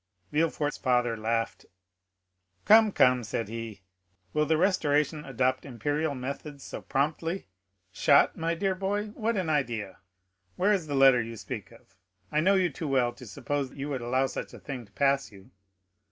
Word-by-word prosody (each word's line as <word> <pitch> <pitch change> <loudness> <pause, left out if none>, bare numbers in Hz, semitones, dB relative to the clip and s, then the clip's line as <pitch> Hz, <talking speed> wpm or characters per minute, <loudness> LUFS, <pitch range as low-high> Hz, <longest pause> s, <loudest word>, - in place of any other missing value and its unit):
Villefort's 150 -1 0
father 125 -2 +1
laughed. 115 +1 -2 1.0
"Come, 220 0 +7
come," 125 -7 +4
said 115 0 -3
he, 115 -3 -7 0.5
"will 150 0 +1
the 160 - +3
Restoration 150 -4 +1
adopt 130 -1 0
imperial 145 +4 -2
methods 140 +2 -6
so - - -7
promptly? 155 +6 -1 0.5
Shot, 140 +7 +4
my 165 +1 -1
dear 190 +2 0
boy? 200 +3 -2
What 220 +1 -2
an 185 -3 -1
idea! 120 -10 -1 0.6
Where 205 +3 +3
is 180 -6 -1
the 145 - -2
letter 135 -2 +6
you 115 0 -6
speak 110 -4 -7
of? - - -19 0.4
I 150 - +2
know 190 +5 +4
you 185 -3 +2
too 155 +3 -5
well 130 -3 +2
to 125 -1 -12
suppose 140 +7 -3
you 140 +1 -5
would 135 -3 -3
allow 130 +3 +1
such 130 - -6
a - - -11
thing 130 -4 -7
to - - -28
pass 140 0 +1
you." 95 -1 -16
140 Hz, 170 wpm, -28 LUFS, 125-160 Hz, 1.0 s, Come